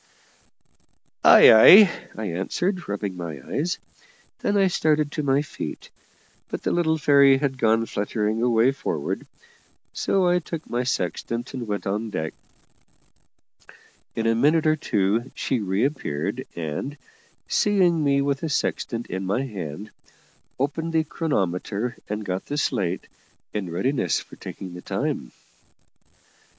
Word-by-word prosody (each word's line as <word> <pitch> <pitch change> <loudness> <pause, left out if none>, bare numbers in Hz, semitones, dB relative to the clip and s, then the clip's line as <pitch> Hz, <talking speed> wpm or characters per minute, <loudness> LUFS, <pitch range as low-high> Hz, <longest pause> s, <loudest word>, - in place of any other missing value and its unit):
"Ay, - - +9
ay," 185 - +9 0.3
I 110 - -4
answered, 175 - -2
rubbing 100 -2 -3
my 85 -5 -6
eyes. 170 +5 -1 0.6
Then 205 - 0
I 195 - +4
started 155 -4 +1
to 150 - -2
my 140 0 +2
feet, - - -7 0.6
but - - -5
the - - 0
little 160 -2 +1
fairy 140 -2 +5
had 135 -1 -2
gone 115 0 +3
fluttering 105 +1 -2
away 120 +1 +3
forward, 80 - -4 0.7
so 190 -2 +1
I 175 0 +3
took 165 -1 -7
my 120 - -1
sextant 115 +1 -3
and 125 -3 -5
went 105 -1 -3
on 105 +3 -2
deck. 80 -6 -4 1.8
In 115 - -2
a 115 - +3
minute 150 +7 +3
or 155 0 +4
two 110 -3 0
she 130 - -1
reappeared, 100 - -2
and, 85 - -4 0.5
seeing 180 -6 +2
me 140 -1 +2
with 140 -1 0
the 160 - -3
sextant 120 -4 -2
in 95 +2 -4
my 100 +8 0
hand, 100 - -7 0.7
opened 160 +4 -2
the 160 -1 +3
chronometer 110 - -2
and 105 0 -4
got 95 -1 -4
the 145 - -3
slate, 95 -11 -1 0.5
in 100 -4 -3
readiness 90 - 0
for - - -12
taking 95 -2 -8
the 90 - -8
time. - - -3
120 Hz, 135 wpm, -24 LUFS, 100-150 Hz, 1.8 s, Ay